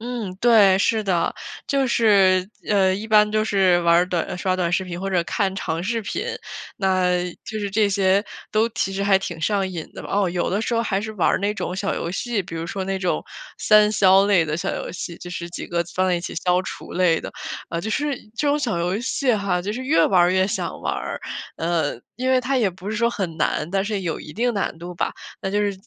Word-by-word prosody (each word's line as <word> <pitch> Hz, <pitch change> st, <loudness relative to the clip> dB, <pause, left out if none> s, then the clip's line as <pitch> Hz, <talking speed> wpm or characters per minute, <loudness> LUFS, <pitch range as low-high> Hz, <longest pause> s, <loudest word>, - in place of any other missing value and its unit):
嗯， 230 Hz, -5 st, -4 dB
对， 210 Hz, -5 st, +6 dB
是 220 Hz, +2 st, +2 dB
的。 185 Hz, -4 st, 0 dB, 0.3 s
就 275 Hz, -2 st, +1 dB
是， 195 Hz, -6 st, +4 dB, 0.2 s
呃 190 Hz, -3 st, +3 dB
一 210 Hz, +3 st, -5 dB
般 210 Hz, -1 st, +5 dB
就 215 Hz, 0 st, +2 dB
是 190 Hz, -4 st, +3 dB
玩 170 Hz, 0 st, +5 dB
儿 175 Hz, +1 st, +3 dB
短 180 Hz, 0 st, -2 dB
刷 185 Hz, 0 st, 0 dB
短 175 Hz, -2 st, -1 dB
视 190 Hz, +2 st, +1 dB
频 175 Hz, -1 st, -6 dB
或 195 Hz, +1 st, -3 dB
者 180 Hz, -2 st, +2 dB
看 195 Hz, +1 st, -1 dB
长 165 Hz, -4 st, -2 dB
视 230 Hz, +5 st, -1 dB
频， 205 Hz, -, -3 dB, 0.5 s
那 185 Hz, -2 st, +2 dB, 0.3 s
就 220 Hz, -, -5 dB
是 205 Hz, -1 st, -2 dB
这 210 Hz, +1 st, +3 dB
些 195 Hz, 0 st, +2 dB, 0.3 s
都 220 Hz, +2 st, +3 dB
其 215 Hz, -4 st, -2 dB
实 195 Hz, +1 st, -2 dB
还 200 Hz, -1 st, +4 dB
挺 175 Hz, -4 st, -6 dB
上 195 Hz, +1 st, +1 dB
瘾 170 Hz, -4 st, -6 dB
的 -, -, -9 dB
吧。 -, -, -9 dB
哦， 195 Hz, -2 st, +2 dB
有 175 Hz, 0 st, -1 dB
的 205 Hz, +4 st, 0 dB
时 240 Hz, -, -2 dB
候 230 Hz, -, +2 dB
还 195 Hz, -3 st, 0 dB
是 220 Hz, +1 st, -5 dB
玩 195 Hz, -, +1 dB
儿 -, -, +2 dB
那 200 Hz, +2 st, 0 dB
种 180 Hz, -, -3 dB
小 195 Hz, +1 st, -1 dB
游 170 Hz, -, -3 dB
戏， 225 Hz, +2 st, -2 dB
比 170 Hz, -, -9 dB
如 165 Hz, 0 st, -3 dB
说 190 Hz, +2 st, -4 dB
那 195 Hz, 0 st, -2 dB
种 185 Hz, -2 st, -1 dB, 0.3 s
三 210 Hz, -1 st, +5 dB
消 195 Hz, -2 st, +5 dB
类 195 Hz, -5 st, +4 dB
的 155 Hz, 0 st, -2 dB
小 -, -, -2 dB
游 -, -, -5 dB
戏， 175 Hz, -1 st, -6 dB
就 175 Hz, -, -9 dB
是 170 Hz, -1 st, -5 dB
几 -, -, -6 dB
个 170 Hz, 0 st, 0 dB
放 185 Hz, 0 st, +2 dB
在 180 Hz, -, +2 dB
一 175 Hz, -, -1 dB
起 -, -, -6 dB
消 180 Hz, 0 st, +3 dB
除 -, -, -8 dB
类 175 Hz, -3 st, +2 dB
的。 -, -, -7 dB, 0.4 s
呃， 170 Hz, -, -3 dB
就 220 Hz, +5 st, -4 dB
是 295 Hz, +3 st, 0 dB, 0.2 s
这 295 Hz, -, 0 dB
种 285 Hz, -, +3 dB
小 235 Hz, -11 st, -1 dB
游 180 Hz, +4 st, 0 dB
戏 255 Hz, 0 st, +1 dB
哈， 200 Hz, -3 st, 0 dB
就 200 Hz, +4 st, -3 dB
是 255 Hz, +4 st, -5 dB
越 295 Hz, +4 st, +4 dB
玩 185 Hz, -2 st, +4 dB
儿 175 Hz, -, +4 dB
越 185 Hz, 0 st, +3 dB
想 210 Hz, +3 st, -3 dB
玩 -, -, -1 dB
儿。 -, -, -5 dB, 0.4 s
嗯， 165 Hz, -7 st, -1 dB
因 255 Hz, +3 st, -1 dB
为 255 Hz, -1 st, +4 dB
它 270 Hz, +1 st, 0 dB
也 220 Hz, -6 st, +2 dB
不 185 Hz, +2 st, -9 dB
是 215 Hz, -, -2 dB
说 235 Hz, +2 st, +2 dB
很 185 Hz, -8 st, -4 dB
难， 155 Hz, -, 0 dB
但 195 Hz, +1 st, 0 dB
是 210 Hz, -1 st, -2 dB
有 170 Hz, -3 st, -3 dB
一 150 Hz, -, -9 dB
定 240 Hz, +5 st, 0 dB
难 195 Hz, -5 st, -2 dB
度 175 Hz, +1 st, -7 dB
吧。 -, -, -1 dB, 0.3 s
那 190 Hz, -, -3 dB
就 205 Hz, +1 st, +1 dB
是 205 Hz, -1 st, +1 dB
195 Hz, 265 characters per minute, -22 LUFS, 180-215 Hz, 0.5 s, 对